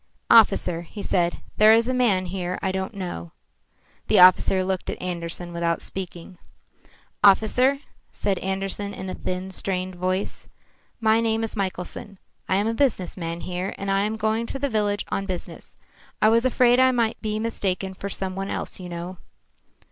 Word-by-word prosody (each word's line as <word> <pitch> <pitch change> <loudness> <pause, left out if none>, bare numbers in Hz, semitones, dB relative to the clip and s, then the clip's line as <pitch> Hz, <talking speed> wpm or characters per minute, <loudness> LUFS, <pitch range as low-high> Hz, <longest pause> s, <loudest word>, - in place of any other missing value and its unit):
"Officer," 170 -1 +5
he 200 +4 -9
said, 175 -2 0
"there 215 +1 +7
is 230 +1 +2
a 255 - 0
man 220 -7 +2
here 180 0 -3
I 190 - +1
don't 190 +2 -4
know." 175 - -6 0.7
The - - +3
officer 185 +1 +6
looked 185 -1 -2
at - - -4
Andersen 175 -1 -5
without 170 0 0
speaking. 180 -1 -7 0.8
"Officer," 250 +7 +4 0.3
said 195 -2 -1
Andersen 195 +1 -3
in 190 0 -6
a - - -4
thin, 185 +1 -4
strained 185 0 -2
voice, 185 +2 -3 0.5
"my 220 -1 +3
name 225 0 0
is 225 - -4
Michelson. 195 +1 -4 0.3
I 190 - +3
am 200 +2 +2
a 225 - 0
business 225 -8 0
man 170 -1 -5
here, 180 +2 -4
and 195 0 -3
I 195 0 +2
am 215 +2 -1
going 220 +2 0
to - - -4
the 280 +1 -1
village 205 -3 0
on 195 - -2
business. 185 -2 -6 0.4
I 215 - +5
was 230 +2 +3
afraid 250 -1 +4
I 260 0 +6
might 235 -3 0
be 215 -1 -2
mistaken 195 -4 -2
for 200 +1 -6
some 190 -1 -3
one 195 +1 -4
else - - -3
you 180 -1 -7
know." 175 +2 -6
195 Hz, 175 wpm, -24 LUFS, 180-220 Hz, 0.8 s, there